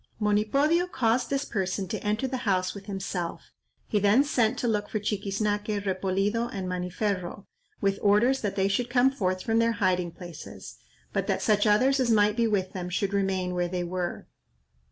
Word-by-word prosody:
Monipodio 275 - +2
caused 235 +1 +1
this 275 +1 -1
person 190 -2 -2
to - - -4
enter 215 +5 0
the 260 0 -3
house 185 -1 +1
with 200 -1 -10
himself; 185 -3 -4 0.4
he 210 - +1
then 205 +7 +5
sent 250 -4 +1
to 245 - -1
look 210 -2 0
for 215 - -1
Chiquiznaque, 205 0 -1
Repolido, 195 +4 0
and 190 -4 -4
Maniferro, 180 +1 -3 0.4
with 195 0 +1
orders 225 +6 +3
that 205 -2 -2
they 195 0 +2
should 235 +5 0
come 250 +2 +4
forth 185 -7 -1
from 225 0 +2
their 230 0 +3
hiding 185 -4 +1
places, 170 -2 -10 0.4
but - - -1
that - - 0
such 210 0 +3
others 255 +7 +4
as 255 -2 +2
might 210 -2 +4
be 230 -1 +2
with 190 -3 -1
them 180 -1 -4
should 195 +2 -1
remain 190 -2 0
where 175 0 0
they 180 0 -2
were. 175 0 -3
205 Hz, 180 wpm, -27 LUFS, 185-230 Hz, 0.4 s, then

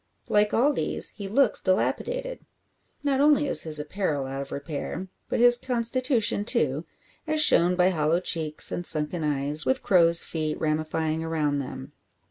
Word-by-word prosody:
Like 210 0 +2
all 275 +6 +2
these, - - -1
he 200 -2 -8
looks 235 +3 +2
dilapidated. - - -2 0.6
Not 275 -1 +1
only 295 0 +4
is 155 - 0
his 155 -2 -2
apparel 150 -2 -3
out 135 +1 -5
of 140 - -8
repair, 150 +6 -6 0.2
but - - -1
his 240 0 +6
constitution 245 -3 +1
too, 150 -4 -1 0.4
as 310 0 0
shown 180 - +5
by 180 +1 +3
hollow 160 0 +1
cheeks 160 -4 -2
and 175 - -3
sunken 155 +1 -1
eyes, 145 +1 0
with 260 0 -1
crows' 170 -3 +4
feet 155 -2 -4
ramifying 155 +1 -2
around 155 -3 -1
them. 130 - -7
170 Hz, 155 wpm, -25 LUFS, 155-235 Hz, 0.6 s, his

